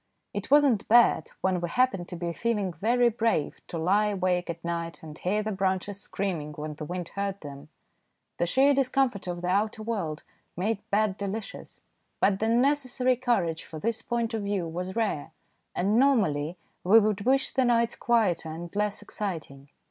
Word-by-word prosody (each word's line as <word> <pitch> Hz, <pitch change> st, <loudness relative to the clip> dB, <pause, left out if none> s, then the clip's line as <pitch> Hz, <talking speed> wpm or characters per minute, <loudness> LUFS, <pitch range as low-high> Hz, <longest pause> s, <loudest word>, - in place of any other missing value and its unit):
It -, -, -4 dB
was 290 Hz, +1 st, +7 dB
not 240 Hz, -8 st, +2 dB
bad 235 Hz, +1 st, +5 dB
when 185 Hz, -2 st, +1 dB
we 175 Hz, -, -2 dB
happened 220 Hz, -5 st, +1 dB
to -, -, -6 dB
be 170 Hz, 0 st, -3 dB
feeling 210 Hz, -3 st, -1 dB
very 235 Hz, +8 st, +2 dB
brave 225 Hz, -9 st, -1 dB
to 170 Hz, -, -5 dB
lie 195 Hz, +6 st, +2 dB
awake 185 Hz, -3 st, 0 dB
at 170 Hz, 0 st, -6 dB
night 170 Hz, -1 st, -4 dB
and 155 Hz, -1 st, -9 dB
hear 205 Hz, +6 st, -1 dB
the 215 Hz, -, -2 dB
branches 190 Hz, 0 st, -1 dB
screaming 170 Hz, -7 st, -3 dB
when 150 Hz, +1 st, -5 dB
the 150 Hz, +1 st, -7 dB
wind 175 Hz, +1 st, -5 dB
hurt 200 Hz, 0 st, -3 dB
them. 145 Hz, 0 st, -10 dB, 0.7 s
The 175 Hz, -, +1 dB
sheer 275 Hz, +9 st, +4 dB
discomfort 260 Hz, -6 st, +1 dB
of 175 Hz, 0 st, -4 dB
the 180 Hz, -, -1 dB
outer 210 Hz, +3 st, 0 dB
world 185 Hz, -9 st, -3 dB, 0.3 s
made 205 Hz, +3 st, 0 dB
bed 205 Hz, -1 st, +1 dB
delicious. 200 Hz, +2 st, -6 dB, 0.4 s
But 195 Hz, -1 st, +3 dB
the 220 Hz, -, 0 dB
necessary 255 Hz, +1 st, +2 dB
courage 230 Hz, -10 st, 0 dB
for 160 Hz, -, -9 dB
this 230 Hz, +8 st, -1 dB
point 235 Hz, -1 st, -2 dB
of 220 Hz, -, -1 dB
view 200 Hz, -4 st, -1 dB
was 180 Hz, +3 st, -5 dB
rare, 165 Hz, -9 st, -1 dB, 0.4 s
and 205 Hz, +6 st, +2 dB
normally 180 Hz, -, +2 dB, 0.3 s
we 210 Hz, +5 st, +7 dB
would 210 Hz, -2 st, 0 dB
wish 265 Hz, +5 st, +2 dB
the 265 Hz, -, +2 dB
nights 235 Hz, -1 st, +2 dB
quieter 205 Hz, -9 st, +1 dB
and 170 Hz, +3 st, -7 dB
less 210 Hz, 0 st, -1 dB
exciting. 160 Hz, -10 st, -6 dB
200 Hz, 180 wpm, -27 LUFS, 170-230 Hz, 0.7 s, was